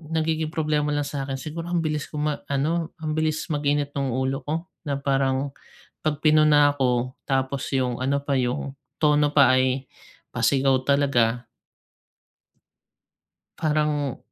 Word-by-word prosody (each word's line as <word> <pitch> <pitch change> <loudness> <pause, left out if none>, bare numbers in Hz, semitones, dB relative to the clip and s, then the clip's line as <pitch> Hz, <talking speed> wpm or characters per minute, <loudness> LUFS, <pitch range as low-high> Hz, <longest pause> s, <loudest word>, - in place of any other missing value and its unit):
nagiging 160 0 0
problema 150 -2 0
lang 145 0 0
sa 140 -2 -4
'kin 135 -1 -3
siguro, 165 +4 -6
ang 175 -2 0
bilis 150 -1 -2
ko 150 - -7
ma-ano 150 +2 -1
ang 155 -1 -4
bilis 155 0 -1
mag-init 145 0 0
ng 140 -2 -1
ulo 130 +1 -1
ko 150 - 0 0.3
na 140 - -1
parang, 135 0 0 0.5
'pag 155 -1 0
pinuna 150 -2 +5
ako, 125 -2 0 0.2
tapos, 135 0 0
yung 125 -2 0
ano 135 +2 +1
pa 140 - -1
yung 130 +2 -2 0.2
tono 150 -1 +3
pa 135 -3 +6
ay 130 +1 0 0.5
pasigaw 135 -1 +2
talaga. 125 -4 +2 2.1
Parang 150 -3 0
145 Hz, 135 wpm, -24 LUFS, 135-150 Hz, 2.1 s, pa